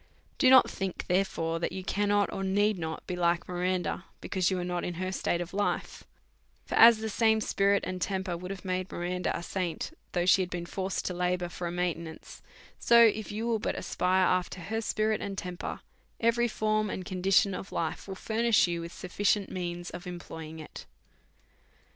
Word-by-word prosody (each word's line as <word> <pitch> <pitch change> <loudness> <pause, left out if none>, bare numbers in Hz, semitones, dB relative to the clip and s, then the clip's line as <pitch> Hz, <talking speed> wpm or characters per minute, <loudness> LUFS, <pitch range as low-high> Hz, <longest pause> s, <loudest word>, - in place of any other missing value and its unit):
Do 260 - +6
not 260 -1 +8
think, 190 -2 -4
therefore, 175 -3 0
that - - -1
you 190 +1 -5
cannot 205 +1 +1
or 195 -1 -3
need 205 +1 +2
not 160 -1 -5
be 180 - -3
like 170 -1 +1
Miranda, 180 0 -1
because 185 -2 0
you 190 - 0
are 180 - -2
not 175 -1 -2
in 175 - -3
her 185 +2 -3
state 175 -2 -1
of 175 +1 -6
life; 205 +1 -2 0.6
for - - -6
as 230 0 +8
the 220 0 -4
same 220 0 +3
spirit 200 -1 +2
and 185 0 -4
temper 190 -1 -1
would 180 +2 -7
have 195 -1 -7
made 185 0 -2
Miranda 180 +1 -2
a - - -7
saint, 185 - -3 0.2
though 175 -1 +1
she 190 +1 +5
had 180 - -2
been 175 -1 -4
forced 190 +2 -3
to 180 - -1
labour 180 0 -1
for 175 0 -5
a - - -3
maintenance, 170 -2 -4 0.4
so 235 0 +6
if 220 -1 +1
you 215 +2 -3
will 230 -2 +1
but - - -2
aspire 185 +1 +1
af 180 - -9
ter 185 - -8
her 220 +6 -2
spirit 215 0 0
and 195 -1 -4
temper, 180 -1 -5 0.4
every 235 +1 +3
form 215 -1 0
and 185 -1 -4
condition 190 +1 +2
of 190 - -6
life 165 +3 -3
will 190 - -5
furnish 225 +2 +2
you 170 -1 -2
with 170 0 -7
sufficient 200 +3 0
means 175 -1 -4
of 175 +1 -8
em 180 -1 -5
ploying 160 -2 -9
it. 155 - -10
185 Hz, 200 wpm, -29 LUFS, 175-205 Hz, 0.6 s, not